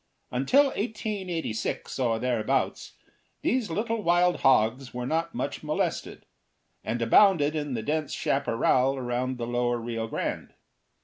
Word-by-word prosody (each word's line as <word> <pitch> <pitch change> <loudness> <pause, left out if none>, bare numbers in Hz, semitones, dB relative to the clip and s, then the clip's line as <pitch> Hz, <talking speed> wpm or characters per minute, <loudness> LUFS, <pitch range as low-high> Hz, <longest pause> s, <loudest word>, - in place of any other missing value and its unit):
Until 135 - +4
1886, 190 - -3
or 115 -3 +1
thereabouts, 120 -2 -1 0.5
these 250 -4 +1
little 220 +6 -1
wild 175 -1 +3
hogs 125 0 +2
were 125 0 -3
not 160 +5 -1
much - - -3
molested, - - -3 0.6
and 115 +2 -2
abounded 155 - +5
in 145 -4 -2
the 110 - -3
dense 150 +2 -1
chaparral 135 0 +1
around 125 0 -2
the 120 - -3
lower 120 0 0
Rio 115 -1 -4
Grande. - - -4
135 Hz, 125 wpm, -27 LUFS, 120-175 Hz, 0.6 s, abounded